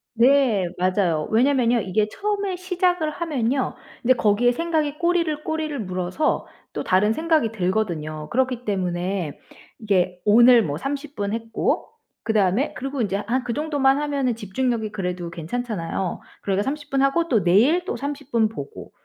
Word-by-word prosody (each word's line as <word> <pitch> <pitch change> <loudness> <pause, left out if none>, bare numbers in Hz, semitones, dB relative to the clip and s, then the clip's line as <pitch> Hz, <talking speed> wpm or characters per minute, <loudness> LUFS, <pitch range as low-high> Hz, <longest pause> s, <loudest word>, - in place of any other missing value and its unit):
네. 240 -6 +4
맞아요. 180 -4 +1
왜냐면요 245 0 +3
이게 210 +1 0
처음에 400 - -2
시작을 360 -3 0
하면요. 275 -5 -1 0.3
근데 255 - +5
거기에 230 +1 +3
생각이 310 0 -1
꼬리를 335 -3 +1
꼬리를 310 -2 -2
물어서 185 - -1 0.3
또 - - -3
다른 205 +4 +3
생각이 315 -4 +1
들거든요. 175 -7 -2
그렇기 255 -1 0
때문에 180 -4 -2 0.4
이게 185 -5 0
오늘 235 +3 +7
뭐 145 -4 -3
30 285 - -5
분 200 +1 -2
했고 225 0 -1 0.3
그다음에 215 +3 +1
그리고 270 0 -3
인제 200 -3 0
한 250 +4 0
그 235 - -3
정도만 285 -1 +2
하면은 280 -5 0
집중력이 225 +1 -2
그래도 180 -4 -4
괜찮잖아요. 180 0 -3 0.2
그러니까 195 0 0
30 290 +3 -5
분하고 275 +5 +2
또 225 -8 +2
내일 245 - +4
또 - - -4
30 285 +1 -6
분 225 -2 +3
보고 140 -11 -9
235 Hz, 325 characters per minute, -23 LUFS, 195-285 Hz, 0.4 s, 오늘